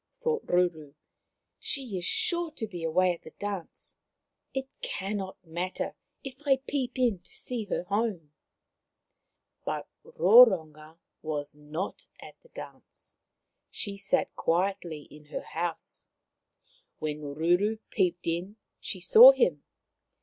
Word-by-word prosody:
thought 470 -2 -1
Ruru. 165 -5 +1 0.3
" - - -56 0.3
She 260 -8 -2
is 180 -1 -2
sure 345 -7 +1
to 230 - -3
be 180 -6 -7
away 180 +3 +3
at 170 - -11
the 160 - -13
dance. 200 -4 -5 0.5
It 265 0 -3
cannot 195 -1 -3
matter 175 +3 -3 0.3
if 270 0 -9
I 275 -2 +4
peep 265 -2 -2
in 240 -7 +2
to 175 - -22
see 240 -4 -3
her 195 - -2
home." 200 -6 -1 1.3
But - - -3 0.2
Roronga 165 -7 +5 0.2
was 150 -2 -3
not 150 +5 -5
at - - -11
the 485 - -22
dance. - - -12 0.5
She 200 -1 -4
sat 200 0 0
quietly 170 -3 0
in 150 0 -14
her 150 - -5
house. 170 +1 -5 0.9
When 150 -1 -3
Ruru 175 +9 +1
peeped 175 -1 0
in 175 +5 -2 0.2
she 190 - -5
saw 225 +8 +10
him. 180 - +2
185 Hz, 130 wpm, -29 LUFS, 165-225 Hz, 1.3 s, saw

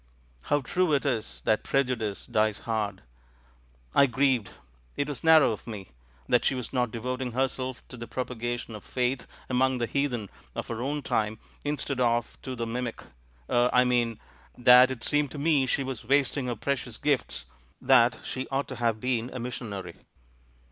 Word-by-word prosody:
How 145 0 +2
true 175 +5 +1
it 140 - +2
is 115 -6 -2
that 110 - +2
preju 135 -2 +1
dice 105 -4 -4
dies 110 -1 +1
hard! 105 -4 -2 0.9
I 140 - +6
grieved 130 -4 +2 0.3
— - - -33
it 145 - 0
was 145 -3 -5
narrow 160 -5 +7
of 110 - -6
me! 105 -5 -7 0.2
— - - -31
that 120 - +3
she - - +2
was 125 -1 -5
not 125 -2 +1
devotipg 125 +2 -3
herself 130 0 -2
to 125 - -9
the 120 0 -7
propa 125 0 -4
gation 120 -1 -4
of 105 - -9
faith 125 +1 -1 0.2
among 130 0 +2
the 120 - 0
heathen 125 -6 -1 0.2
of - - -4
our 115 0 -3
own 145 +3 -2
time, 110 -2 0 0.3
instead 145 -2 -2
of 120 -1 0
to 130 -1 -5
the 115 -1 -2
mimic 120 0 -4 0.2
— - - -32
er 120 0 +4
— - - -7
I 125 - +6
mean 120 -3 +1 0.4
that 125 +1 +8
it 130 -4 -5
seemed 145 -1 +1
to - - -6
me 145 -2 +3
she 135 - +1
was 130 -4 -5
wasting 135 +1 +2
her 120 - -1
precious 125 -1 -3
gifts, 140 - 0 0.3
that 125 -2 +5
she 130 0 -4
ought 135 +1 -1
to - - -6
have 115 -2 +1
been 125 0 -1
a 130 - -6
missionary." 105 -7 -5
125 Hz, 190 wpm, -28 LUFS, 115-135 Hz, 0.9 s, that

